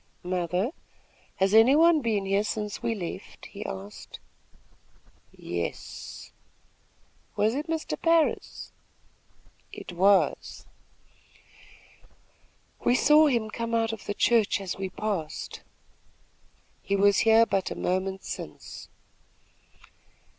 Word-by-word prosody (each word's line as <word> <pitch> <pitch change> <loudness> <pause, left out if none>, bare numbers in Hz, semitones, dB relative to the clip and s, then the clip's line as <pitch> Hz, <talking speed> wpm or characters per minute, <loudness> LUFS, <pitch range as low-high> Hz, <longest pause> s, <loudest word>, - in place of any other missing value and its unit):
"Mother, 180 - -1 0.6
has 190 +1 +1
any 225 +5 +7
one 325 0 +5
been 215 -5 0
here 195 +1 +1
since 210 -1 -4
we 230 - -1
left?" 180 -5 -7
he - - -8
asked. 95 +2 -8 1.1
"Yes." 85 -1 -6 1.0
"Was 210 +2 +2
it 295 +5 -3
Mr. 320 -1 -3
Parris?" 330 -1 +1 1.0
"It - - -9
was." 195 +3 +2 2.2
"We 245 - +3
saw 300 +3 +6
him 230 -6 0
come 230 0 -3
out 225 0 +1
of 220 - -9
the 205 - -2
church 225 -3 +3
as 190 -2 -4
we 190 -1 -4
passed." 185 -6 -4 1.2
"He 200 - -1
was 200 0 +4
here 225 0 +5
but 195 -4 -1
a - - -5
moment 190 +1 -2
since." - - -8
210 Hz, 105 wpm, -27 LUFS, 190-230 Hz, 2.2 s, any